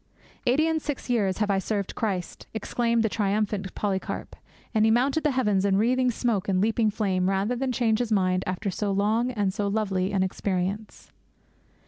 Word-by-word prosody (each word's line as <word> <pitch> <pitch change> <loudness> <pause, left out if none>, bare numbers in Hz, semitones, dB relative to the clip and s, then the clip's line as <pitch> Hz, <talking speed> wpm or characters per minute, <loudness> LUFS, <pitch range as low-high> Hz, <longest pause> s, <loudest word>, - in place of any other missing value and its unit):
'Eighty 275 +6 +4
and 320 -1 0
six 285 -4 -4
years 200 -6 +1
have 210 -2 +1
I 195 - +2
served 200 0 -2
Christ,' 190 -6 -3
exclaimed 230 +1 0
the - - +3
triumphant 205 -2 -1
Polycarp; 195 -2 -3 0.4
and 215 -2 +3
he 220 - +5
mounted 265 +7 +2
the 300 - +3
heavens 210 -8 +1
in 195 -1 +2
wreathing 250 +4 +2
smoke 225 -5 -1
and 185 -1 +2
leaping 220 +2 +2
flame 190 -3 0
rather 195 +5 0
than 260 +1 -1
change 230 -3 +1
his 240 -2 -2
mind 185 -3 +2
after 190 +2 -2
so 205 +2 -2
long 215 +5 +1
and 205 -6 -1
so 205 +1 -1
lovely 195 -3 0
an 195 -2 +1
experience. 190 +2 -3
210 Hz, 180 wpm, -26 LUFS, 195-235 Hz, 0.4 s, he